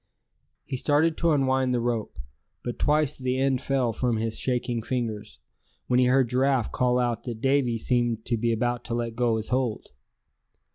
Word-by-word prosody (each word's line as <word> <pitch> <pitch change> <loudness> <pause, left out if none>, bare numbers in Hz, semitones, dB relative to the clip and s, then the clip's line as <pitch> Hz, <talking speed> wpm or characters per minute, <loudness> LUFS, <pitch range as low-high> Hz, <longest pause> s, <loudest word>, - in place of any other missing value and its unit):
He 130 - -4
started 155 +4 +2
to 170 - +1
unwind 130 -3 +2
the - - +1
rope, 115 -2 -2 0.5
but 120 - -5
twice 150 -1 +2
the 130 -1 -2
end 135 -1 +1
fell 130 -4 0
from 120 0 0
his 110 0 -2
shaking 125 -2 -1
fingers, 115 -3 -4 0.5
when 125 - +2
he 125 - +4
heard 130 0 +3
Giraffe 130 0 +1
call 125 -1 +1
out 120 -2 0
that 120 -3 -5
Davy 135 -2 +2
seemed 120 -1 0
to 120 - 0
be 115 +1 0
about 120 +1 -1
to 115 - -3
let 115 -1 -3
go 120 -2 +1
his 110 - -4
hold. 125 -4 -1
125 Hz, 180 wpm, -26 LUFS, 115-130 Hz, 0.5 s, he